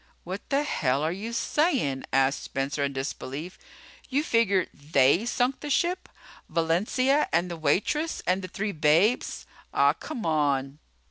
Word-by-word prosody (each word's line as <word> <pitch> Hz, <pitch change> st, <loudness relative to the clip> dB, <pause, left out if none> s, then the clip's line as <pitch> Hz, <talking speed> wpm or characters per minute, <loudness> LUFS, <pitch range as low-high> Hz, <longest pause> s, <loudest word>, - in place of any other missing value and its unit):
"What 185 Hz, +3 st, -5 dB
the 280 Hz, +1 st, +2 dB
hell 140 Hz, -, 0 dB
are 160 Hz, -, +1 dB
you 205 Hz, +6 st, -5 dB
sayin'?" 235 Hz, -, 0 dB
asked 135 Hz, +1 st, +2 dB
Spencer 140 Hz, +1 st, -2 dB
in 140 Hz, -, 0 dB
disbelief. 135 Hz, +5 st, -5 dB, 0.5 s
"You 280 Hz, +3 st, +1 dB
figure 200 Hz, -, +2 dB
they 145 Hz, -, +2 dB
sunk 250 Hz, +2 st, 0 dB
the 295 Hz, -, -6 dB
ship? 350 Hz, +6 st, 0 dB, 0.4 s
Valencia 200 Hz, -, +1 dB
and 175 Hz, +1 st, +1 dB
the -, -, -3 dB
waitress 195 Hz, -, 0 dB
and 185 Hz, +1 st, +1 dB
the 185 Hz, -, -6 dB
three 205 Hz, +3 st, -3 dB
babes? 165 Hz, +8 st, +2 dB, 0.3 s
Ah, -, -, +5 dB
come 250 Hz, -, -7 dB
on." 145 Hz, -3 st, 0 dB
180 Hz, 145 wpm, -27 LUFS, -, 0.5 s, Ah